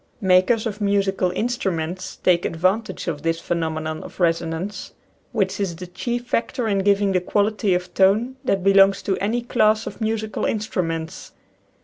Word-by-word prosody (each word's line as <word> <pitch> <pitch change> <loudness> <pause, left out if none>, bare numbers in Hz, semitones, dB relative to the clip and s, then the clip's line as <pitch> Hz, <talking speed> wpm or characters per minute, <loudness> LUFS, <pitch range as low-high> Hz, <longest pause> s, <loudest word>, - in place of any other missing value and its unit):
Makers 190 +4 +3
of 215 -1 -4
musical 195 -2 +1
instruments 185 -5 -2
take 175 -1 +3
advantage 185 +8 -1
of 150 -4 -3
this 165 +1 0
phenomenon 160 -2 -3
of - - -12
resonance, 170 +3 -1 0.4
which 195 -5 -1
is 190 -4 -1
the 180 +2 -8
chief 240 +7 -4
factor 245 0 -1
in 200 -2 +1
giving 200 0 +2
the 185 -1 +1
quality 205 0 +1
of 180 0 -4
tone 215 +7 +3
that 195 -8 0
belongs 195 0 +5
to 195 - 0
any 230 +4 -1
class 215 -2 +2
of - - -8
musical 220 0 -2
instruments. 165 -7 -3
195 Hz, 150 wpm, -22 LUFS, 175-215 Hz, 0.4 s, belongs